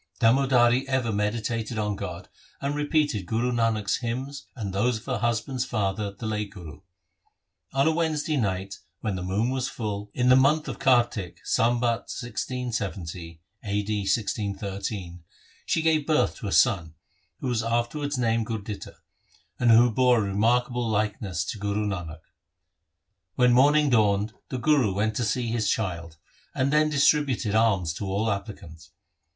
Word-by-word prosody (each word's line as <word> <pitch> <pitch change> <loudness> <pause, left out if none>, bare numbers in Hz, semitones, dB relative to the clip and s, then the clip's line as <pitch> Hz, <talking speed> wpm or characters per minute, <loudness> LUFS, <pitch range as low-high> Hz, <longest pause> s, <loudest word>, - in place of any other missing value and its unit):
Damodari 125 +1 +4
ever 130 -4 0
meditated 110 +2 -2
on 105 -1 -1
God - - -6 0.3
and 140 +1 -2
repeated 145 - 0
Guru 115 +4 0
Nanak's 115 -3 +1
hymns 130 +4 -5
and 105 -7 -5
those 115 +4 +1
of 110 - -13
her - - -2
husband's 120 +3 -1
father 105 -4 -1
the 100 +3 -9
late 105 -1 -2
Guru. 85 -8 -11 0.9
On 135 +3 +3
a - - +4
Wednesday 155 -2 0
night 100 -5 -2 0.2
when 105 -3 -2
the 90 - -4
moon 100 +7 0
was 130 -1 -1
full, 105 -5 -4
in 125 0 +2
the 130 - +8
month 145 +4 +3
of - - -5
Kartik, 120 -8 +1
Sambat 120 0 +1
1670 100 -10 -4 0.2
(a. 105 0 -1
d. 105 0 -2
1613), 100 -3 -3 0.4
she 160 - +1
gave 155 -2 +2
birth 155 -1 +2
to 110 - -6
a - - -3
son, 85 -11 +3 0.4
who - - -4
was 120 -3 0
afterwards 120 +5 -1
named 115 -2 +1
Gurditta, 105 -3 -6 0.6
and 120 - +3
who 115 +1 +6
bore 125 +2 +4
a - - +2
remarkable 120 +4 +1
likeness 105 -5 -1
to 110 +1 -5
Guru 105 +1 -1
Nanak. 85 -6 -4 1.1
When 125 -1 +4
morning 145 +3 +4
dawned, 105 -2 +2 0.2
the 130 - -3
Guru 125 -7 +2
went 110 +2 0
to 125 - 0
see 120 +1 -1
his 115 -1 0
child, 85 -6 -2 0.4
and 140 +1 +1
then 155 0 +4
distributed 140 -6 +2
alms 100 -7 +2
to 100 - -5
all 100 +4 0
applicants. 95 -6 -7
115 Hz, 155 wpm, -26 LUFS, 100-125 Hz, 1.1 s, the